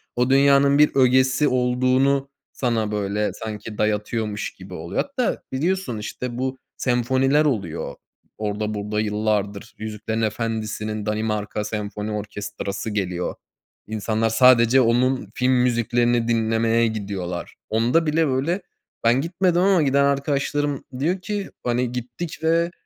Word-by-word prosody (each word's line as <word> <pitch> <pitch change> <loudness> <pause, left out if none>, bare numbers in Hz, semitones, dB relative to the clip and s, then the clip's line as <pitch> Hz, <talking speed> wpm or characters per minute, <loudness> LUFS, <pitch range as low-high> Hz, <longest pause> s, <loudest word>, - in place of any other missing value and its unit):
o 125 +1 +1
dünyanın 140 +1 +5
bir 150 0 +5
ögesi 130 +2 +4
olduğunu 130 +2 +2 0.2
sana, 115 -4 -1
böyle, 105 0 -1
sanki, 105 0 -7
dayatıyormuş 105 0 -1
gibi 95 0 -12
oluyor. 85 0 -2
Hatta 275 -4 -2
biliyorsun, 155 -2 -1
işte, 120 +3 -5
bu 130 +1 -2 0.2
senfoniler 130 +4 +2
oluyor, 100 - -2 0.4
orda, 105 0 -2
burda. 105 0 -2
Yıllardır 105 -1 -1
Yüzüklerin 110 +1 -4
Efendisi'nin 110 -1 -2
Danimarka 105 -1 -2
Senfoni 105 0 -4
Orkestrası 105 -1 -4
geliyor. 90 -4 -2 0.5
İnsanlar 110 +1 0
sadece 125 +2 +6
onun 125 -1 +2
film 130 0 +2
müziklerini 120 -1 +2
dinlemeye 115 0 +2
gidiyorlar. 100 -5 -4
Onda 120 +9 +2
bile, 160 +1 +2
böyle, 145 +8 0 0.4
ben 120 +3 +4
gitmedim 175 +2 +1
ama 190 -2 +4
giden 140 -1 +3
arkadaşlarım 140 0 0 0.2
diyor 175 +6 0
ki, 205 0 -3
"Hani, 120 0 0
gittik 125 +7 -5
ve 165 +1 +2
120 Hz, 120 wpm, -23 LUFS, 105-135 Hz, 0.5 s, sadece